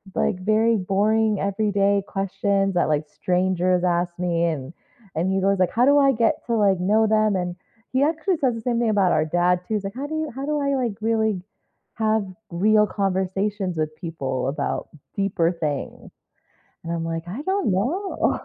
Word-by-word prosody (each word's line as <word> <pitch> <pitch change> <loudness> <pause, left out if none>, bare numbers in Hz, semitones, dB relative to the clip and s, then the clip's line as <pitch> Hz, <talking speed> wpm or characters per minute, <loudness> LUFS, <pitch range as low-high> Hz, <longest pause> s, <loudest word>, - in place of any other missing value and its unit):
like, 180 - 0
very 220 +4 +2
boring 210 +2 +1
everyday 200 0 +1
questions 195 0 0
that, 175 -3 +1
like, 150 0 +1
strangers 180 +1 0
ask 175 -1 0
me," 170 -1 +1
and 155 -3 -3 0.4
and 170 +4 0
he 190 - +1
goes, 195 0 +2
"Like, 185 - +2
how 240 +2 +3
do 285 +1 +5
I 275 -1 +5
get 230 -1 +2
to, 235 - +1
like, 200 -4 +3
know 215 +4 +3
them?" 215 -1 +2
and 180 -1 -2 0.4
he 260 +2 +3
actually 325 +4 +1
says 260 -5 +1
the 225 - -6
same 235 0 0
thing 235 -2 +1
about 200 -4 +3
our 155 - +2
dad 175 +2 +2
too, - - -3
he's 205 - -2
like, 195 0 -5
"How 275 +3 -4
do 315 - -4
you 315 -1 -2
how 270 +3 -5
do 300 0 0
I, 280 -1 0
like, 245 -5 -1
really 220 -3 +1 0.5
have 220 -2 +1 0.3
real 210 +4 +3
conversations 195 0 -1
with 155 0 -1
people 135 -7 -3
about 140 0 -3 0.3
deeper 180 -4 +1
things?" 150 -5 -4 0.8
And 165 - -3
I'm 165 -1 -2
like, 165 0 -3
"I 220 +11 -5
don't 380 - 0
know." 280 - 0
195 Hz, 190 wpm, -23 LUFS, 180-225 Hz, 0.8 s, do